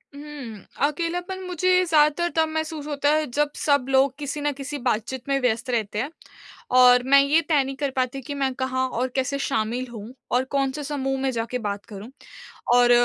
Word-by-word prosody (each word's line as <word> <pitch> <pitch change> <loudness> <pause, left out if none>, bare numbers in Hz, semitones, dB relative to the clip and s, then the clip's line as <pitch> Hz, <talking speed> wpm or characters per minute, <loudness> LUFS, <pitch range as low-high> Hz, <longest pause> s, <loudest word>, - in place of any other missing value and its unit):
हुँ, 285 -7 -8 0.3
अकेलापन 350 +4 -3
मुझे 365 +1 +2
ज़्यादातर 315 +1 +3
तब 320 0 +3
महसूस 315 -1 -4
होता 290 -1 0
है 310 0 +2
जब 295 0 +2
सब 285 -4 +1
लोग 265 0 +3
किसी 290 0 -4
न 290 0 +1
किसी 285 +2 -6
बातचीत 245 +4 -2
में 275 0 +2
व्यस्त 245 +1 0
रहते 215 -3 -1
हैं। 275 +5 -2 0.7
और 250 0 +7
मैं 280 +1 +6
ये 295 +4 +3
तय 290 -3 +4
नहीं 270 +1 -5
कर 280 0 -1
पाती 255 +1 -1
कि 285 +4 -6
मैं 270 -2 0
कहाँ 260 0 -1
और 255 +2 -1
कैसे 275 +1 -1
शामिल 250 -1 -1
हूँ 220 +3 -8 0.2
और 250 +1 +3
कौन-से 275 +1 0
समूह 270 -2 -2
में 270 - +1
जाके 235 +1 -2
बात 205 -2 -4
करूँ। 210 +2 -9 0.7
और 245 0 +5
275 Hz, 190 wpm, -24 LUFS, 250-295 Hz, 0.7 s, और